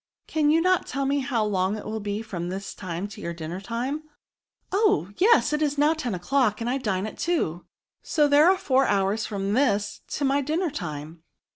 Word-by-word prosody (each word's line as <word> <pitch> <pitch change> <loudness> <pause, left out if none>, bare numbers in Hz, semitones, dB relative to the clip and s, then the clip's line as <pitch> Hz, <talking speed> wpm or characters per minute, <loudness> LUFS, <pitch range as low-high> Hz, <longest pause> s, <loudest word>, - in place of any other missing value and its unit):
" - - -65
Cannot 300 -2 +2 0.3
you - - -17
tell 275 0 -2
me 280 +1 +1
how 255 -5 0
long 195 0 0
it 210 - -8
will 220 0 -3
be 205 +1 -3
from 175 -5 -5
this 195 +1 -5
time 180 +1 -5
to 200 - -10
your 170 0 -4
dinner 170 +3 -6
time 245 +8 -3 0.2
?" - - -68
*' - - -47
Oh! 390 - +2
yes; 430 -5 +4
it 300 - 0
is 290 -1 0
now 295 +2 +4
ten 250 -10 -3
o'clock, 215 +4 +1
and 230 - -3
I 260 +3 0
dine 205 -6 -1
at 215 - -8
two, 180 - -1 0.3
so 300 -2 +2
there 290 +4 +6
are 380 - +4
four 270 -6 +2
hours 200 +2 +1
from 200 -1 -2
this 210 -6 +1
to 290 - -2
my 275 +1 +2
dinner 315 +4 -1
time." 160 - -6
225 Hz, 220 wpm, -25 LUFS, 195-285 Hz, 0.3 s, there